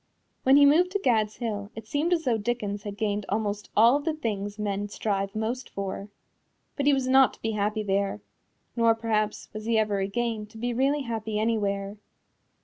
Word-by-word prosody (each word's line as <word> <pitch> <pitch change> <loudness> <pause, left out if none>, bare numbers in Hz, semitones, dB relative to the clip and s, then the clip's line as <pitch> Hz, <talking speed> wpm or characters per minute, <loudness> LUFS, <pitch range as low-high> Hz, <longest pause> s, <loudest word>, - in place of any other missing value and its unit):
When 265 +2 +6
he 285 - +7
moved 330 +6 +5
to 405 - +1
Gad's 220 -4 +2
Hill 205 -4 -4
it 225 0 -8
seemed 295 +9 -1
as 335 -2 +2
though 235 -4 +2
Dickens 205 -2 -2
had 205 0 -7
gained 205 -1 -1
almost 205 0 -2
all 235 +5 +7
of 290 - -6
the 320 -2 0
things 205 -7 -3
men 205 -1 -2
strive 195 -1 -2
most 230 +4 -3
for. 195 +1 -5 0.7
But 285 -1 -1
he - - +7
was 265 -1 -1
not 265 0 +5
to - - -28
be 225 - 0
happy 215 +1 -1
there 195 - 0 0.6
nor, 230 -1 +4
perhaps, 215 -2 -1
was 215 0 -6
he 230 0 +2
ever 210 -2 +1
again 215 +2 -2
to 220 +1 -14
be 240 +2 -2
really 275 +4 +1
happy 220 -3 -3
anywhere. 205 -2 -1
220 Hz, 195 wpm, -27 LUFS, 205-240 Hz, 0.7 s, he